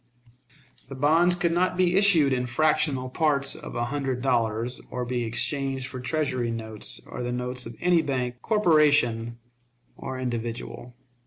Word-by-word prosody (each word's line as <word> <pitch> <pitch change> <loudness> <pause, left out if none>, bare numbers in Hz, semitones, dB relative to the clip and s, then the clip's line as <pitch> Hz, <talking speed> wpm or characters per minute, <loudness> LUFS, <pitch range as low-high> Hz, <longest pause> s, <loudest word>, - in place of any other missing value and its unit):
The 135 - -7
bonds 165 +6 +3
could 175 -1 0
not 180 +1 +1
be 180 -1 +2
issued 175 -9 +4
in 125 -1 -1
fractional 135 0 +1
parts 140 0 +1
of - - -9
a 120 - -1
hundred 135 -1 -3
dollars, 120 -1 0
or 125 0 -4
be 120 0 -2
exchanged 135 +3 -1
for 130 0 -6
Treasury 130 -3 -1
notes 110 -2 -4
or - - -7
the 120 0 -3
notes 125 0 -1
of 115 - -9
any 175 -1 +4
bank, 125 -5 -2
corporation, 150 - +2 0.6
or 130 -1 -6
individual. 120 0 -5
130 Hz, 150 wpm, -26 LUFS, 120-155 Hz, 0.6 s, issued